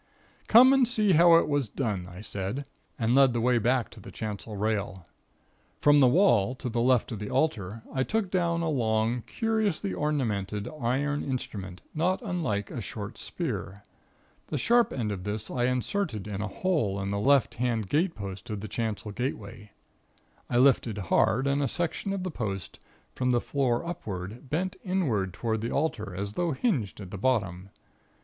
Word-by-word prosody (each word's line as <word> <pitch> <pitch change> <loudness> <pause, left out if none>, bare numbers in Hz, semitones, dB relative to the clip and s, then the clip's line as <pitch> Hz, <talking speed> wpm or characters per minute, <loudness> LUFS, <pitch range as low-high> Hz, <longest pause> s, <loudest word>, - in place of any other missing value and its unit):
"Come 255 +4 +8
and 265 -3 +4
see 215 -4 +3
how 170 0 +7
it 165 - +4
was 145 -6 0
done," 105 -9 -2
I 90 +2 -10
said, 105 +7 -4 0.3
and 115 -1 +1
led 135 -2 +5
the 120 - 0
way 120 +1 +3
back 120 +2 +1
to 115 - -12
the - - -11
chancel 105 0 -5
rail. 100 -3 -2 0.7
From 145 0 +5
the 130 - +7
wall 125 - +4
to 130 -1 -4
the 115 0 0
left 125 -1 +3
of 110 - -4
the 105 - -5
altar 115 -7 -1
I 130 - 0
took 205 +6 -1
down 170 -2 +1
a - - 0
long, 115 -3 +1
curiously 215 - -1
ornamented, 105 -9 -1
iron 140 +5 0
instrument, 100 -9 -5
not 180 +4 +1
unlike 160 - -2
a - - -4
short - - -7
spear. 100 +2 -4 0.6
The - - -2
sharp 240 0 +3
end 110 -5 -2
of 95 -3 -5
this 105 +2 -4
I 120 -1 0
inserted 125 - -1
in 100 -1 -4
a 105 - -2
hole 110 - 0
in 100 0 -3
the 100 - -1
left 135 +4 +3
hand 115 -5 0
gatepost 100 - -2
of 105 -2 -4
the 110 - -5
chancel 110 -1 -3
gateway. 105 -3 -5 0.8
I 120 - +1
lifted 125 -4 +4
hard, 105 +7 +2
and 140 +1 +1
a 140 - +1
section 175 +5 -2
of 195 -2 -2
the 185 - -3
post, 100 - -5 0.3
from 125 0 -1
the 120 -1 +3
floor 125 -1 0
upward, 110 - -6
bent 180 +6 -1
inward 135 - 0
toward 110 +3 -2
the 115 - -2
altar, 120 - -2
as 100 +2 -4
though 175 +1 0
hinged 130 - -1
at 95 -3 -8
the 100 - -6
bottom. 100 -6 0
120 Hz, 180 wpm, -28 LUFS, 105-150 Hz, 0.8 s, Come